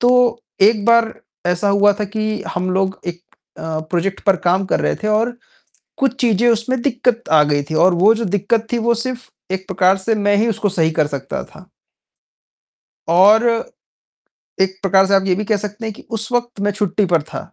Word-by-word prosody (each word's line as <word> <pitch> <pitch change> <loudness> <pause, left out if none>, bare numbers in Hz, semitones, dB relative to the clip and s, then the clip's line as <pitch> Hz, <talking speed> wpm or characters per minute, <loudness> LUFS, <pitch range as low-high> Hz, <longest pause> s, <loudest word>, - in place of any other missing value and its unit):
तो 245 -1 +3 0.2
एक 210 0 +4
बार 235 -1 +4 0.3
ऐसा 180 +3 0
हुआ 200 +1 +4
था - - +1
कि 215 +1 -3
हम 185 +1 -2
लोग 190 0 -1
एक 175 0 -5 0.4
अ, - - -9 0.3
प्रोजेक्ट 185 +2 -2
पर 195 -2 +4
काम 185 +2 +2
कर - - +1
रहे - - 0
थे 215 - -1
और 225 +3 0 0.6
कुछ 270 -3 +1
चीज़ें 235 -1 +2
उसमें 235 +2 0
दिक्कत 250 -3 0 0.2
आ 150 - +6
गई 145 -1 0
थी - - -2
और 185 -1 +4
वो 190 +6 +5
जो 230 +1 -3
दिक्कत 210 +3 0
थी, 240 - +1
वो 235 +1 +1
सिर्फ़ 250 +2 -5 0.2
एक 190 0 -4
प्रकार 185 +1 +2
से 225 +3 +1
मैं 205 -1 +1
ही 220 +3 +1
उसको 210 -1 -1
सही 165 -4 +1
कर 150 - +3
सकता 135 0 -5
था। - - -17 1.4
और, 200 +7 +5 1.2
एक 190 0 0
प्रकार 195 0 +3
से 195 - 0
आप 195 - +2
ये 185 - +3
भी 210 - -3
कह 215 -1 +1
सकते 210 +2 -6
हैं 220 - -4
कि - - -14
उस 220 +2 -5
वक़्त 240 -2 -2
मैं 205 0 +1
छुट्टी 205 0 -1
पर 170 -3 +1
था। 155 - -7
205 Hz, 200 wpm, -18 LUFS, 190-230 Hz, 1.4 s, आ